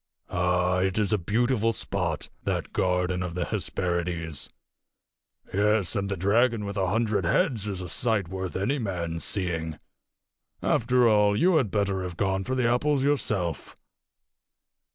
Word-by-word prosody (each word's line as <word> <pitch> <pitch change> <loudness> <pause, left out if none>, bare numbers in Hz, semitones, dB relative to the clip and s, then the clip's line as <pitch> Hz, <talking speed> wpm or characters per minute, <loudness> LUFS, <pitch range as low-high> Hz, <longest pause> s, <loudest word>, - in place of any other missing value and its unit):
Ah, 90 +1 +1
it 95 +1 0
is 105 -1 +1
a 105 - +2
beautiful 115 +4 +1
spot, 90 -7 -2
that - - -2
garden 90 0 +1
of 90 -2 -4
the 90 -1 -1
Hesperides! 85 -3 -2 1.0
Yes, 105 0 +2
and 100 -1 -1
the 100 - -2
dragon 110 +4 +2
with 100 0 -5
a 95 -2 0
hundred 105 0 +1
heads 115 - +1
is 95 -2 -3
a - - -5
sight 110 0 0
worth 95 0 -5
any 125 +10 0
man's 85 -6 -3
seeing. 80 -5 -2 0.9
After 125 +1 +3
all, 105 -2 +4
you 180 +3 +4
had 130 -9 +1
better 100 -1 0
have 90 -2 -5
gone 95 -1 0
for 130 +6 -2
the 125 -2 +2
apples 135 +3 +2
yourself." 100 - -1
100 Hz, 150 wpm, -27 LUFS, 90-110 Hz, 1.0 s, all